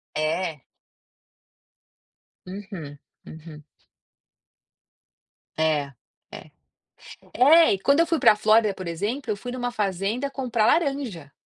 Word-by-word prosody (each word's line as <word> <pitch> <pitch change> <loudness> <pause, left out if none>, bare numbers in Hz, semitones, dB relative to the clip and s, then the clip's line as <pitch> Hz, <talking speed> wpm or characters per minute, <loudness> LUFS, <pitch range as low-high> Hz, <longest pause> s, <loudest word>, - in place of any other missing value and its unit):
É. 155 -1 -2 1.8
Uhum, 185 -7 -9 0.3
uhum. 155 -1 -12 1.9
É, 150 -3 0 0.4
é. - - -11 0.8
É, 310 +6 +6
e - - -4
quando 280 +9 +2
eu 335 - +3
fui 330 -2 0
para 210 - +5
Flórida, 215 -1 +3
por 185 -2 -8
exemplo, 215 - -4
eu 205 - -1
fui 245 +4 -7
em - - -6
uma 245 -1 -3
fazenda 210 +6 -2
comprar 240 -5 -1
laranja. 270 - -1
205 Hz, 110 wpm, -24 LUFS, 165-250 Hz, 1.9 s, É